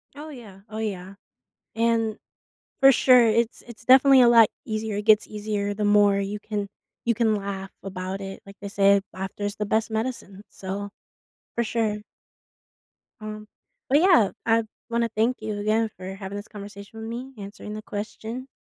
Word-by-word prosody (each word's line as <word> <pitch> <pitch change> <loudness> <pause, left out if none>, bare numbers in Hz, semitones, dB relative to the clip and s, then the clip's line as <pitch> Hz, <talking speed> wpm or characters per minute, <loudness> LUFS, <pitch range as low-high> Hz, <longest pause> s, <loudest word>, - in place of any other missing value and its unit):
Oh, 300 +2 -8
yeah, 215 -8 -12
oh, 215 - -7
yeah. 195 -3 -4 0.6
And, 225 -1 +1 0.6
for 270 - +9
sure, 250 -2 +6
it's 230 +1 +1
it's 230 -1 -13
definitely 265 +1 +7
a 240 - +7
lot 230 -2 +7 0.2
easier, 215 -1 -3
it 205 - -3
gets 215 -1 +5
easier 205 -1 -2
the 210 +1 -2
more 205 -1 +5
you 200 +1 -3
can 205 -2 -4 0.4
you 235 - +2
can 220 -1 +2
laugh 195 -1 -5
about 190 0 -5
it, 195 0 -7
like 200 0 -13
they 200 - -7
say, 200 0 +4
"Laughter 190 +2 -5
is 205 0 -2
the 210 - -2
best 220 +1 +1
medicine," 220 -3 -4
so, 200 +1 -5 0.7
for 235 - +1
sure. 220 -2 -1 1.2
Um, 215 0 -7 0.4
but 285 +3 +5
yeah, 340 - +5
I 230 0 +3 0.3
wanna 235 0 0
thank 225 +3 +1
you 215 -1 -3
again 220 +2 +1
for 185 +1 -7
having 195 0 -7
this 205 +1 -6
conversation 205 +1 -10
with 220 - -6
me, 255 +3 -6
answering 205 +1 -8
the 215 - -6
question. 220 +5 -6
215 Hz, 170 wpm, -25 LUFS, 200-230 Hz, 1.2 s, for